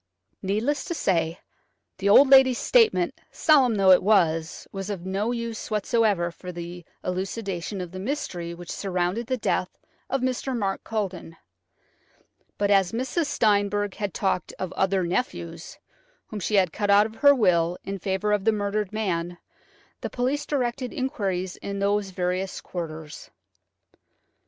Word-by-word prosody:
Needless 220 Hz, +9 st, 0 dB
to 340 Hz, -, -3 dB
say, 170 Hz, -, 0 dB, 0.6 s
the 200 Hz, +1 st, +1 dB
old 270 Hz, +7 st, +8 dB
lady's 265 Hz, -2 st, +7 dB
statement, 460 Hz, -3 st, +2 dB
solemn 270 Hz, -7 st, +4 dB
though 195 Hz, -2 st, +5 dB
it 185 Hz, -, +7 dB
was, 165 Hz, -6 st, +1 dB
was 195 Hz, 0 st, -5 dB
of 190 Hz, -4 st, -5 dB
no 195 Hz, +5 st, -1 dB
use 235 Hz, -2 st, -4 dB
whatever 210 Hz, -4 st, +1 dB
for 180 Hz, +1 st, -9 dB
the 175 Hz, 0 st, -7 dB, 0.2 s
elucidation 190 Hz, 0 st, -3 dB
of 180 Hz, -2 st, -6 dB
the 185 Hz, -, -7 dB
mystery 190 Hz, -, -3 dB
which 175 Hz, 0 st, -8 dB
surrounded 185 Hz, +4 st, -2 dB
the 255 Hz, 0 st, 0 dB
death 185 Hz, -4 st, -1 dB, 0.3 s
of 270 Hz, 0 st, 0 dB
Mr. 255 Hz, 0 st, -1 dB
Mark 195 Hz, -3 st, -2 dB
Culledon. 190 Hz, -6 st, -4 dB, 1.2 s
But 205 Hz, 0 st, +1 dB
as 195 Hz, -2 st, +3 dB
Mrs. 260 Hz, +7 st, -1 dB
Steinberg 205 Hz, -4 st, +1 dB
had 205 Hz, -2 st, -2 dB
talked 190 Hz, -1 st, -1 dB
of 185 Hz, -2 st, -4 dB
"other 190 Hz, -1 st, +1 dB
nephews," 170 Hz, -4 st, -3 dB, 0.5 s
whom 215 Hz, -, -5 dB
she 210 Hz, +3 st, -1 dB
had 185 Hz, -4 st, +3 dB
cut 205 Hz, -1 st, -2 dB
out 200 Hz, +1 st, +6 dB
of 220 Hz, 0 st, -8 dB
her 285 Hz, -1 st, +6 dB
will 175 Hz, -6 st, +2 dB
in 195 Hz, 0 st, -5 dB
favour 190 Hz, +3 st, -1 dB
of 205 Hz, -2 st, +1 dB
the 225 Hz, -, +4 dB
murdered 205 Hz, -1 st, -2 dB
man, 175 Hz, -5 st, -2 dB, 0.6 s
the -, -, -3 dB
police 260 Hz, +4 st, -1 dB
directed 255 Hz, -2 st, -1 dB
inquiries 190 Hz, -8 st, -2 dB
in 200 Hz, 0 st, -5 dB
those 200 Hz, 0 st, 0 dB
various 185 Hz, +1 st, -2 dB
quarters. 160 Hz, -3 st, -7 dB
200 Hz, 150 wpm, -25 LUFS, 180-230 Hz, 1.2 s, old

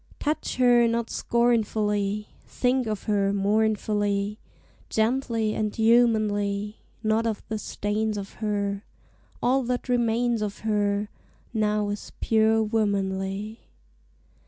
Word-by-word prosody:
Touch 305 Hz, +1 st, -2 dB
her 245 Hz, -2 st, +5 dB
not 230 Hz, 0 st, -1 dB
scornfully! 210 Hz, -3 st, 0 dB, 0.2 s
Think 250 Hz, -1 st, 0 dB
of 215 Hz, -2 st, -3 dB
her 200 Hz, -2 st, +1 dB
mournfully, 205 Hz, 0 st, 0 dB, 0.5 s
Gently 225 Hz, -1 st, 0 dB
and 215 Hz, -1 st, -2 dB
humanly, 215 Hz, -3 st, +2 dB, 0.3 s
Not 220 Hz, +1 st, +2 dB
of 220 Hz, -3 st, -3 dB
the 220 Hz, -1 st, -2 dB
stains 210 Hz, +1 st, -2 dB
of 195 Hz, -1 st, -6 dB
her; 200 Hz, -1 st, -1 dB, 0.6 s
All 260 Hz, +2 st, +3 dB
that 250 Hz, +1 st, -2 dB
remains 240 Hz, -1 st, +1 dB
of 205 Hz, -1 st, -4 dB
her 205 Hz, -1 st, 0 dB, 0.4 s
Now 210 Hz, -2 st, +1 dB
is 205 Hz, 0 st, -6 dB
pure 220 Hz, 0 st, +3 dB
womanly. 200 Hz, -1 st, -1 dB
215 Hz, 110 wpm, -26 LUFS, 205-230 Hz, 0.6 s, her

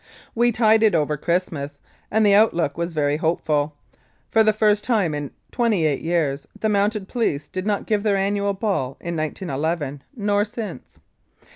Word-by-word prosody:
We 240 Hz, +1 st, +3 dB
tided 220 Hz, -2 st, +4 dB
over 150 Hz, -1 st, +1 dB
Christmas 160 Hz, -3 st, -2 dB
Day, -, -, -33 dB, 0.3 s
and 220 Hz, 0 st, +2 dB
the 200 Hz, -, +5 dB
outlook 175 Hz, -8 st, +3 dB
was 170 Hz, +1 st, -2 dB
very 145 Hz, -2 st, +1 dB
hopeful. 150 Hz, -2 st, 0 dB, 0.6 s
For 225 Hz, -, +5 dB
the 215 Hz, -, +4 dB
first 210 Hz, -1 st, +2 dB
time 205 Hz, -10 st, +1 dB
in 145 Hz, -2 st, -4 dB, 0.2 s
twenty 225 Hz, -9 st, +1 dB
eight 145 Hz, -3 st, 0 dB
years, 155 Hz, -5 st, -1 dB
the 220 Hz, -, 0 dB
Mounted 205 Hz, -1 st, +1 dB
Police 175 Hz, -, -1 dB
did 185 Hz, +2 st, -5 dB
not 205 Hz, -1 st, 0 dB
give 210 Hz, -2 st, +1 dB
their 205 Hz, -2 st, +2 dB
annual 200 Hz, +1 st, 0 dB
ball 190 Hz, -, -2 dB
in 170 Hz, 0 st, -4 dB
1911, 155 Hz, -2 st, -3 dB
nor 205 Hz, -2 st, +1 dB
since. 220 Hz, 0 st, -7 dB
190 Hz, 165 wpm, -22 LUFS, 150-215 Hz, 0.6 s, the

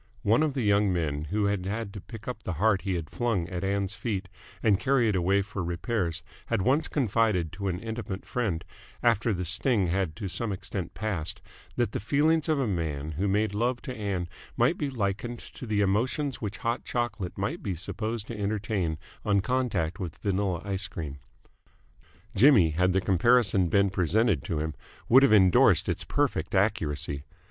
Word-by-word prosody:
One 110 Hz, +7 st, +4 dB
of 155 Hz, -3 st, +1 dB
the 130 Hz, -, 0 dB
young 100 Hz, -1 st, +3 dB
men 75 Hz, -4 st, -1 dB
who 105 Hz, +6 st, 0 dB
had 100 Hz, -2 st, 0 dB
had 105 Hz, 0 st, -3 dB
to 100 Hz, -, -7 dB
pick 115 Hz, +1 st, -11 dB
up 125 Hz, -3 st, -4 dB
the 90 Hz, -, -3 dB
heart 100 Hz, +4 st, +2 dB
he 95 Hz, -2 st, -1 dB
had 85 Hz, -3 st, -5 dB
flung 115 Hz, -8 st, 0 dB
at 90 Hz, 0 st, -4 dB
Ann's 100 Hz, 0 st, 0 dB
feet 95 Hz, -1 st, -3 dB, 0.3 s
and 105 Hz, -4 st, +4 dB
carry 130 Hz, -3 st, +3 dB
it 105 Hz, -, +1 dB
away 95 Hz, +2 st, +2 dB
for 95 Hz, -2 st, -5 dB
repairs 85 Hz, 0 st, -2 dB, 0.2 s
had 95 Hz, -, 0 dB
once 145 Hz, +7 st, +2 dB
confided 110 Hz, -, +1 dB
to 100 Hz, +4 st, -4 dB
an 90 Hz, -2 st, -1 dB
intimate 110 Hz, -3 st, -5 dB
friend, 105 Hz, -10 st, -2 dB, 0.4 s
after 115 Hz, -1 st, +3 dB
the 90 Hz, -2 st, -2 dB
sting 95 Hz, -, +1 dB
had 90 Hz, -3 st, 0 dB
to 105 Hz, 0 st, -4 dB
some 100 Hz, +5 st, -2 dB
extent 95 Hz, -2 st, -5 dB
passed, 100 Hz, -1 st, -3 dB, 0.4 s
that 120 Hz, -4 st, 0 dB
the -, -, -2 dB
feelings 150 Hz, -, +2 dB
of 155 Hz, -2 st, +2 dB
a 135 Hz, -, +1 dB
man 80 Hz, -7 st, -2 dB
who 90 Hz, +7 st, -1 dB
made 105 Hz, +1 st, +1 dB
love 120 Hz, +4 st, 0 dB
to 130 Hz, -4 st, -5 dB
Ann 100 Hz, -5 st, -2 dB, 0.3 s
might -, -, +3 dB
be 145 Hz, -, -2 dB
likened 120 Hz, 0 st, -2 dB
to 125 Hz, -, -10 dB
the 105 Hz, -1 st, +1 dB
emotions 125 Hz, +8 st, 0 dB
which 105 Hz, -3 st, -4 dB
hot 115 Hz, +1 st, -2 dB
chocolate 110 Hz, -7 st, -3 dB
might 100 Hz, +1 st, -2 dB
be 95 Hz, -3 st, -2 dB
supposed 105 Hz, +5 st, -3 dB
to 115 Hz, -, -6 dB
entertain 100 Hz, -5 st, -1 dB, 0.3 s
on 100 Hz, -1 st, +3 dB
contact 100 Hz, -9 st, -1 dB
with 85 Hz, -5 st, -5 dB
vanilla 95 Hz, -3 st, -1 dB
ice 100 Hz, 0 st, -2 dB
cream. 70 Hz, -4 st, -6 dB, 1.1 s
Jimmy, 105 Hz, -, +6 dB
had 90 Hz, +4 st, +2 dB
the 95 Hz, -, +2 dB
comparison 100 Hz, 0 st, +3 dB
been 100 Hz, +2 st, +3 dB
presented 95 Hz, -, +2 dB
to 80 Hz, -, -2 dB
him, 80 Hz, 0 st, -2 dB, 0.3 s
would 130 Hz, +3 st, +7 dB
have 140 Hz, -, +5 dB
endorsed 95 Hz, -5 st, +5 dB
its -, -, -1 dB
perfect 85 Hz, +5 st, -1 dB
accuracy. 75 Hz, -8 st, 0 dB
100 Hz, 185 wpm, -28 LUFS, 90-115 Hz, 1.1 s, would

